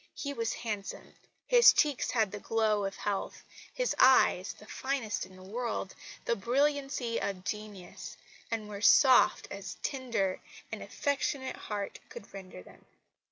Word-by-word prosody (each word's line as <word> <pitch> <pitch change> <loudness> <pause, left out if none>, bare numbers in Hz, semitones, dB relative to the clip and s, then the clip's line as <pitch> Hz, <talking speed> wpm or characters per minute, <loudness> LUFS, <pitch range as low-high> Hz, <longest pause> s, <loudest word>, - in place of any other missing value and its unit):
He 280 -1 -4
was 230 -4 -1
handsome. 210 -4 -6 0.3
His 485 -1 +8
cheeks 295 -4 +1
had 220 -5 +1
the 205 - -6
glow 215 -2 +1
of 195 - -4
health; 200 -2 -3 0.3
his - - -1
eyes 255 -8 +5
the 210 - -16
finest 250 -5 -3
in 185 - -16
the 185 - -13
world 225 -1 -3 0.3
the 235 - +1
brilliancy 270 +1 0
of 185 -2 -3
genius, 205 -3 -7 0.3
and 225 -2 -3
were 205 -1 -7
soft 260 +4 +6
as - - -6
a - - -2
tender 235 -9 -2 0.3
and - - -5
affectionate 280 -1 -2
heart 205 -2 -5
could 200 - -11
render 185 - -9
them. - - -17
220 Hz, 150 wpm, -31 LUFS, 200-265 Hz, 0.3 s, His